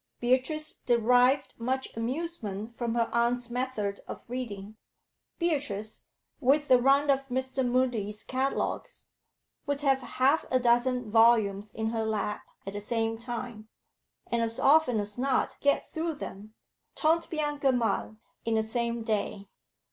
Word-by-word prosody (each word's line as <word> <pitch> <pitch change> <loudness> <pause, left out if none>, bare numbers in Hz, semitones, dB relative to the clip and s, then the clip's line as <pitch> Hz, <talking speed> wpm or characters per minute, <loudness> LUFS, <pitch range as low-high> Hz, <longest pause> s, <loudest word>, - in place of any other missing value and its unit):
Beatrice 260 +6 +1
derived 250 +3 +2
much 260 +3 -2
amusement 230 - -3
from 235 -1 -2
her 230 -1 +2
aunt's 240 +1 +1
method 240 -5 -2
of - - -7
reading. 215 -4 -6 0.6
Beatrice, 280 - -2 0.4
with 290 +2 +2
the 250 -1 +6
run 280 +2 +4
of 270 0 0
Mr. 260 +1 -1
Mudie's 240 -4 0
catalogues, 265 +1 -2 0.6
would 285 0 -1
have 270 -2 +3
half 265 +4 +2
a 255 - +3
dozen 245 -1 +2
volumes 215 -3 +4
in 220 +1 -2
her 225 -1 -1
lap 215 -1 -2 0.2
at 195 - -5
the 205 - -4
same 225 +1 -1
time, 235 -2 -6 0.6
and 235 0 -1
as 230 0 -1
often 275 -6 +4
as 205 +3 -4
not 265 0 +1
get 285 0 +1
through 325 -1 -2
them 215 -5 -9 0.4
tant 325 +1 +2
bien 295 -2 -2
que 275 -1 +3
mal 230 -3 -1 0.3
in 230 -1 0
the 220 - +2
same 235 +1 -2
day. 205 -2 -2
240 Hz, 140 wpm, -29 LUFS, 220-265 Hz, 0.6 s, the